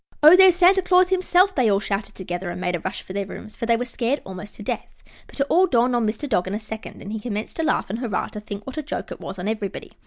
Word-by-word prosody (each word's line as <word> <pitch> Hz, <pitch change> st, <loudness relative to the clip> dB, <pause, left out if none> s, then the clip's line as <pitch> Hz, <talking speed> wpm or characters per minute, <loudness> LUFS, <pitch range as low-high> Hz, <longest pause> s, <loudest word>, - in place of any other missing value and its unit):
"Oh, 310 Hz, +4 st, +10 dB
there's 375 Hz, -1 st, +7 dB
Santa 370 Hz, +2 st, +5 dB
Claus 365 Hz, 0 st, +4 dB
himself!" 370 Hz, +1 st, +3 dB
they 250 Hz, -8 st, +2 dB
all 200 Hz, -1 st, +3 dB
shouted 200 Hz, 0 st, -3 dB
together, 180 Hz, -1 st, -5 dB
and 175 Hz, +1 st, -5 dB
made 180 Hz, -1 st, -1 dB
a -, -, -3 dB
rush 190 Hz, +4 st, -5 dB
for 185 Hz, -, -9 dB
their 200 Hz, -1 st, -2 dB
rooms, 215 Hz, -, -10 dB
for 230 Hz, -, -4 dB
they 230 Hz, -1 st, +4 dB
were 245 Hz, -, -2 dB
scared 245 Hz, +3 st, -1 dB
almost 190 Hz, +2 st, -9 dB
to -, -, -9 dB
death. -, -, -5 dB, 0.2 s
But -, -, -12 dB
it 275 Hz, -, +3 dB
all 370 Hz, +5 st, +4 dB
dawned 245 Hz, -2 st, +2 dB
on 235 Hz, -2 st, +1 dB
Mr. 235 Hz, +7 st, -3 dB
Dog 185 Hz, -8 st, +1 dB
in 195 Hz, -, -2 dB
a -, -, -2 dB
second, 220 Hz, 0 st, -8 dB
and 205 Hz, -, -6 dB
he 220 Hz, -, -3 dB
commenced 210 Hz, -1 st, -5 dB
to 325 Hz, -, 0 dB
laugh 310 Hz, -, +1 dB
and 225 Hz, -, -3 dB
hurrah 230 Hz, -7 st, -2 dB
to 210 Hz, -, -7 dB
think 205 Hz, -1 st, -8 dB
what 265 Hz, +4 st, -5 dB
a -, -, -1 dB
joke 295 Hz, -, -5 dB
it -, -, -8 dB
was 190 Hz, -, -7 dB
on 180 Hz, +2 st, -4 dB
everybody. 215 Hz, -2 st, -4 dB
220 Hz, 290 wpm, -23 LUFS, 200-295 Hz, 0.2 s, Oh